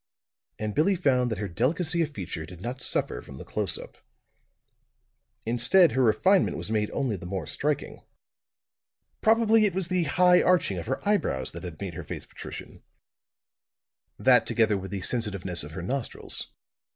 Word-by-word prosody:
And 105 -1 -3
Billie 175 - +3
found 130 -8 +2
that 110 - -3
her 105 +1 -3
delicacy 160 - 0
of 160 - 0
feature 90 - -6
did 90 0 -11
not 125 +6 -5
suffer - - -1
from - - -12
the - - -9
close - - -1
up. - - -12 1.5
Instead, 130 +9 +5
her 130 - +1
refinement 150 - +3
was - - -5
made 105 -1 0
only 130 -6 -1
the 85 - -9
more 95 -3 -4
striking. 145 - -2 1.2
Probably 225 0 +4
it 195 -4 0
was 185 -2 0
the 180 -2 +1
high 180 +4 +5
arching 170 - +2
of 85 - -7
her 135 - -3
eyebrows 190 - 0
that - - -9
had 85 -4 -8
made 95 -3 -5
her 85 +1 -6
face - - -7
patrician; - - -10 1.4
that, 125 -3 +4
together 110 -3 +2
with 95 -1 -5
the 100 -2 -4
sensitiveness 100 - -1
of 75 +2 -9
her 85 - -6
nostrils. 130 +5 -3
120 Hz, 165 wpm, -27 LUFS, -, 1.5 s, Instead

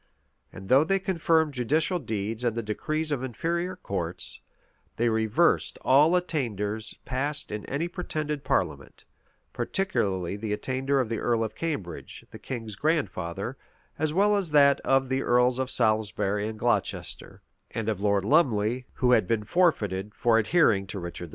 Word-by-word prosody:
and 95 0 -10
though 135 +6 +6
they 195 +5 +1
confirmed 165 -5 +1
judicial 155 +8 +1
deeds 110 -2 -3
and 120 -2 0
the 115 - -2
decrees 155 +9 -2
of 140 -4 -1
inferior 170 +8 -2
courts, 90 - -4 0.5
they 120 +1 +1
reversed 110 +9 +2
all 150 +7 +5
attainders 110 - -3
passed 140 +3 -2
in 105 -1 -4
any 150 +6 -1
pretended 155 -5 -4
parliament; 75 - -2 0.5
particularly 100 - -1
the 105 0 -3
attainder 130 +5 -1
of 125 - +1
the 115 0 -3
earl 115 -2 +1
of 110 -1 -4
Cambridge, 110 - -5
the - - -10
king's 115 -5 -6
grandfather; 120 - -2 0.4
as 155 0 0
well 205 +5 +3
as 195 -5 0
that 140 -2 +5
of 135 0 +2
the 130 +1 0
earls 125 0 +3
of 130 -1 -1
Salisbury 105 -3 +1
and 110 0 -6
Glocester, 120 +2 -2 0.3
and 115 -2 -4
of 105 -3 -1
Lord 100 -1 +2
Lumley, 125 -3 +2
who 125 -1 +1
had 110 -7 +4
been 115 -2 0
forfeited 105 - +1
for 115 -2 +3
adhering 110 - +3
to 100 - -6
Richard 85 0 -6
II. - - -16
120 Hz, 155 wpm, -27 LUFS, 105-150 Hz, 0.5 s, though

